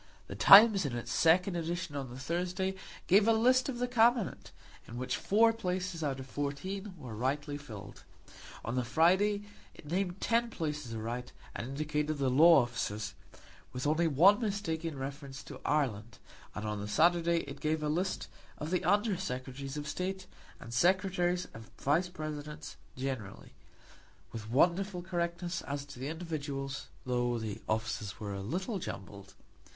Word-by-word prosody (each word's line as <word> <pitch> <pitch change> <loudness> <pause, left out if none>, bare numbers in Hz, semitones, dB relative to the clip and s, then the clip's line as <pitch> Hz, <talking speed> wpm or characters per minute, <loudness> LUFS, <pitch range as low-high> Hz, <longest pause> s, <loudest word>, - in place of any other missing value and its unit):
The - - -8
Times, 205 -1 +9
in 130 -5 -2
its 120 - -4
second 180 +3 +4
edition 170 -2 -3
on 135 -3 -4
the 125 - -9
Thursday, 180 +6 -2 0.3
gave 200 +4 +5
a 225 - +6
list 255 +4 +4
of 250 - -3
the 245 +1 0
Cabinet, 235 -3 +2 0.4
in 120 - -8
which 130 +1 -2
four 225 +3 +4
places 180 -5 -3
out 135 -3 -1
of 130 - -7
fourteen 185 +9 -4
were 130 -7 -8
rightly 145 +5 -1
filled. 110 -9 -10 0.6
On 115 - -2
the 125 0 0
Friday 190 - +3 0.3
it - - -14
named 180 +3 -2
ten 235 0 +1
places 150 - -4
aright, 120 +3 -5 0.2
and 115 - -4
indicated 150 +2 -2
the 135 -2 +1
law 155 +1 +7
officers, 110 -3 -3 0.6
with 125 +2 -4
only 160 +3 +3
one 175 - +6
mistake 200 -7 -2
in 160 -4 -4
reference 135 0 -6
to - - -10
Ireland; 120 -7 -1 0.4
and 105 - -4
on 105 -1 -2
the 105 - -4
Saturday 170 +6 +3
it 140 0 -9
gave 155 +1 -1
a - - 0
list 180 +5 -1 0.3
of 150 +2 -5
the 180 - +1
Under 205 +1 +2
Secretaries 135 -3 -5
of 150 0 -5
State, 190 +3 -3 0.3
and 115 - -9
Secretaries 180 +3 +2
and 115 0 -10
Vice 165 +6 +2
Presidents 150 -3 -6 0.2
generally, 130 -7 -5 0.8
with 110 -2 -7
wonderful 180 - +2
correctness 175 -1 -2
as 140 0 -4
to 140 -3 -11
the 130 - -3
individuals, 145 -5 -4 0.2
though 120 -1 0
the 110 -3 -5
offices 110 -2 -2
were 105 -2 -4
a 100 - -4
little 185 - -3
jumbled. 100 - -8
155 Hz, 160 wpm, -32 LUFS, 130-185 Hz, 0.8 s, Times